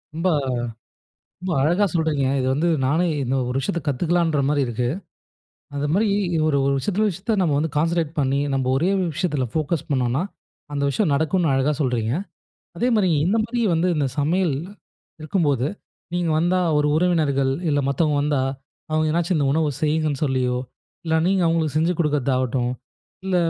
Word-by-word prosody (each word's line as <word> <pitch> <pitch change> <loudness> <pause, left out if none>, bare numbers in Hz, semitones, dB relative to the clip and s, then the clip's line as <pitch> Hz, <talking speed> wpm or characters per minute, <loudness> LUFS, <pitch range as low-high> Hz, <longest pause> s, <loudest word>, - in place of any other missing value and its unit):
ரொம்ப 170 +3 +1 1.1
ரொம்ப 185 0 -3
அழகா 175 +7 +3
சொல்றீங்க. 160 -5 0
இத 130 - 0
வந்து 165 +5 +1 0.2
நானே, 160 +7 +2 0.2
இந்த 130 +2 0
ஒரு 125 - -2
விஷயத்த 165 +5 -2
கத்துக்கலான்ற 165 +3 +1
மாரி 145 -1 +2
இருக்கு. 120 +1 -1 0.9
அந்த 140 +1 -1
மாதிரி 215 +4 +2 0.4
ஒரு 145 -2 +2
ஒரு 140 - +2
விஷயத்துல 205 +9 0
விஷத்தா 195 +5 -3
நம்ப 165 -5 +2
வந்து 155 +1 -1
கான்சென்ட்ரேட் 165 0 +1
பண்ணி, 135 0 +1
நம்ப 135 -1 0
ஒரே 165 +7 +1 0.2
விஷயத்தில 150 -6 -1
ஃபோக்கஸ் 155 0 -1
பண்ணோன்னா, 130 0 +1 0.5
அந்த 140 - -1
விஷயம் 160 +2 +1
நடக்குன்னு 160 +2 +1
அழகா 135 +3 +2
சொல்றீங்க. 120 -3 0 0.6
அதே 240 +8 +1
மாதிரி, 190 -4 +2 0.2
இந்த 205 +5 +2
மாதிரி 240 +1 -2
வந்து 170 +3 +1
இந்த 145 -2 +1
சமையல் 165 +2 +1 0.7
இருக்கும்போது, 150 -5 0 0.5
நீங்க 175 -2 0
வந்தா 175 +3 +2 0.2
ஒரு 150 - +2
உறவினர்கள் 150 -6 +2 0.2
இல்ல 145 -1 +2
மத்தவங்க, 150 +2 +1
வந்தா 145 -2 +1 0.5
அவுங்க 155 0 +1
எதுனாச்சும் 170 +2 +1
இந்த 145 - +1
உணவு 155 0 +1
செய்யுங்கன்னு 155 -2 0
சொல்லியோ, 125 -2 0 0.5
இல்ல 160 -1 0
நீங்க 190 -1 +2
அவுங்களுக்கு 160 -2 0
செஞ்சி 165 +3 +2
கொடுக்குறதாகட்டும், 130 -4 0 0.5
இல்ல 185 -1 +1
155 Hz, 155 wpm, -22 LUFS, 140-175 Hz, 1.1 s, அழகா